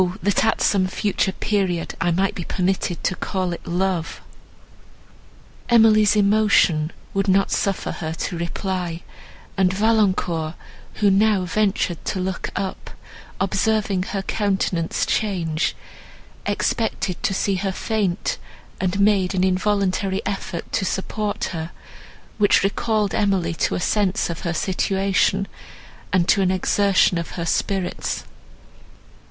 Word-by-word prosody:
that 205 Hz, +1 st, +2 dB
at 225 Hz, -, +1 dB
some 190 Hz, -2 st, +3 dB
future 195 Hz, +1 st, 0 dB
period 190 Hz, -6 st, -1 dB
I 170 Hz, -, +2 dB
might 190 Hz, +3 st, +1 dB
be 175 Hz, -, -5 dB
permitted 185 Hz, 0 st, -1 dB
to 185 Hz, -, 0 dB
call 185 Hz, -2 st, -2 dB
it -, -, -9 dB
love!" 180 Hz, -1 st, -1 dB, 1.5 s
Emily's 220 Hz, -3 st, +5 dB
emotion 200 Hz, -6 st, +3 dB, 0.2 s
would 195 Hz, 0 st, 0 dB
not 195 Hz, +1 st, +3 dB
suffer 195 Hz, -1 st, -1 dB
her 160 Hz, -1 st, -4 dB
to 165 Hz, +2 st, -4 dB
reply; 175 Hz, 0 st, -3 dB, 0.5 s
and 190 Hz, -1 st, +3 dB
Valancourt, 185 Hz, -6 st, +1 dB, 0.4 s
who 205 Hz, -2 st, +3 dB
now 200 Hz, -1 st, +3 dB
ventured 195 Hz, -2 st, 0 dB
to 190 Hz, -, -2 dB
look 185 Hz, 0 st, -3 dB
up, 195 Hz, -1 st, -4 dB, 0.5 s
observing 200 Hz, 0 st, +1 dB
her 195 Hz, +1 st, -3 dB
countenance 190 Hz, -5 st, 0 dB
change, 170 Hz, -7 st, 0 dB, 0.7 s
expected 210 Hz, -5 st, -1 dB
to -, -, 0 dB
see 195 Hz, 0 st, 0 dB
her 195 Hz, +1 st, -1 dB
faint, 200 Hz, -2 st, -1 dB, 0.4 s
and 190 Hz, +1 st, -1 dB
made 200 Hz, -2 st, +3 dB
an 185 Hz, -, +2 dB
involuntary 190 Hz, 0 st, +1 dB
effort 195 Hz, -4 st, -4 dB
to -, -, 0 dB
support 205 Hz, +2 st, -2 dB
her, 160 Hz, -1 st, -4 dB, 0.7 s
which 205 Hz, -2 st, +4 dB
recalled 210 Hz, +1 st, 0 dB
Emily 190 Hz, -5 st, +1 dB
to -, -, 0 dB
a -, -, -1 dB
sense 195 Hz, 0 st, +1 dB
of 165 Hz, -, -6 dB
her 170 Hz, -, -2 dB
situation, 195 Hz, +1 st, +1 dB, 0.6 s
and 180 Hz, -2 st, +2 dB
to 200 Hz, -, +4 dB
an 185 Hz, -, +2 dB
exertion 190 Hz, -1 st, +2 dB
of 170 Hz, -, -6 dB
her 170 Hz, -, -2 dB
spirits. 190 Hz, +2 st, -1 dB
190 Hz, 125 wpm, -22 LUFS, 180-205 Hz, 1.5 s, Emily's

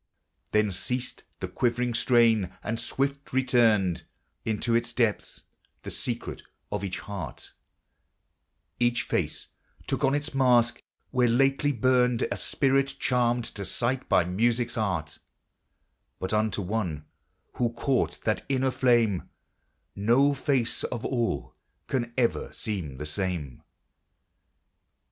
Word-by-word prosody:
Then 105 Hz, -1 st, +3 dB
ceased 125 Hz, +7 st, -2 dB, 0.2 s
the -, -, -2 dB
quivering 120 Hz, 0 st, 0 dB
strain, 115 Hz, -5 st, +4 dB
and 115 Hz, +1 st, -2 dB
swift 140 Hz, 0 st, -2 dB
returned 115 Hz, -8 st, +3 dB, 0.4 s
Into 110 Hz, +2 st, 0 dB
its 120 Hz, 0 st, +1 dB
depths 115 Hz, -4 st, -1 dB, 0.4 s
the -, -, -6 dB
secret -, -, -4 dB, 0.3 s
of 105 Hz, -1 st, -2 dB
each 95 Hz, -2 st, -3 dB
heart; 100 Hz, -2 st, -7 dB, 1.3 s
Each 120 Hz, 0 st, +2 dB
face -, -, -2 dB, 0.4 s
took -, -, -2 dB
on 135 Hz, +1 st, +3 dB
its 145 Hz, +1 st, -3 dB
mask, 125 Hz, -3 st, +3 dB, 0.3 s
where 125 Hz, -1 st, +3 dB
lately 135 Hz, +4 st, +3 dB
burned 125 Hz, -1 st, +2 dB
A -, -, -1 dB
spirit 135 Hz, 0 st, +1 dB
charmed 120 Hz, -1 st, +1 dB
to 100 Hz, -, -5 dB
sight 125 Hz, +6 st, -1 dB
by 90 Hz, -, +5 dB
music's 120 Hz, +6 st, +1 dB
art; 90 Hz, -9 st, -2 dB, 1.0 s
But 95 Hz, -, -3 dB
unto 105 Hz, -2 st, +1 dB
one 90 Hz, -7 st, -2 dB, 0.5 s
who 120 Hz, -1 st, +1 dB
caught 125 Hz, +2 st, -1 dB
that 110 Hz, -, 0 dB
inner 130 Hz, -1 st, +2 dB
flame 120 Hz, -8 st, +2 dB, 0.7 s
No 120 Hz, +8 st, +4 dB
face 135 Hz, -3 st, 0 dB
of 120 Hz, 0 st, -4 dB
all 115 Hz, -, -1 dB, 0.3 s
can 120 Hz, -3 st, -2 dB
ever 120 Hz, -2 st, +1 dB
seem 90 Hz, -11 st, -4 dB
the 75 Hz, -, -5 dB
same. 75 Hz, -5 st, -3 dB
120 Hz, 120 wpm, -27 LUFS, 100-125 Hz, 1.3 s, by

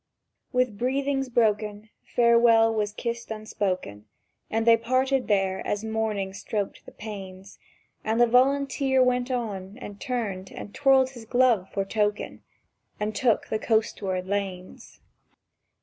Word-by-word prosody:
—With 250 Hz, -5 st, 0 dB
breathings 270 Hz, +1 st, 0 dB
broken 215 Hz, -2 st, 0 dB
Farewell 235 Hz, -1 st, +4 dB
was 210 Hz, -2 st, -1 dB
kissed 235 Hz, +2 st, -5 dB
unspoken, 190 Hz, -, -3 dB, 0.4 s
And 225 Hz, +1 st, 0 dB
they 230 Hz, 0 st, +7 dB
parted 255 Hz, +3 st, 0 dB
there 195 Hz, -2 st, +1 dB
as 205 Hz, +1 st, -2 dB
morning 220 Hz, -3 st, -2 dB
stroked 200 Hz, +1 st, -4 dB
the -, -, -10 dB
panes; 195 Hz, -3 st, -9 dB, 0.4 s
And 220 Hz, +2 st, 0 dB
the 240 Hz, -, +7 dB
Volunteer 265 Hz, +2 st, +3 dB
went 250 Hz, 0 st, +1 dB
on, 210 Hz, -5 st, -4 dB
and 205 Hz, -5 st, -9 dB
turned, 205 Hz, -8 st, -3 dB
and 205 Hz, -, -9 dB
twirled 270 Hz, -2 st, +4 dB
his 240 Hz, -4 st, -11 dB
glove 235 Hz, -5 st, +2 dB
for 195 Hz, -1 st, -1 dB
token, 210 Hz, 0 st, -1 dB, 0.6 s
And 210 Hz, +1 st, -2 dB
took 240 Hz, -4 st, +1 dB
the 215 Hz, -, -1 dB
coastward 200 Hz, -5 st, 0 dB
lanes. 190 Hz, -2 st, -5 dB
220 Hz, 130 wpm, -26 LUFS, 200-250 Hz, 0.6 s, they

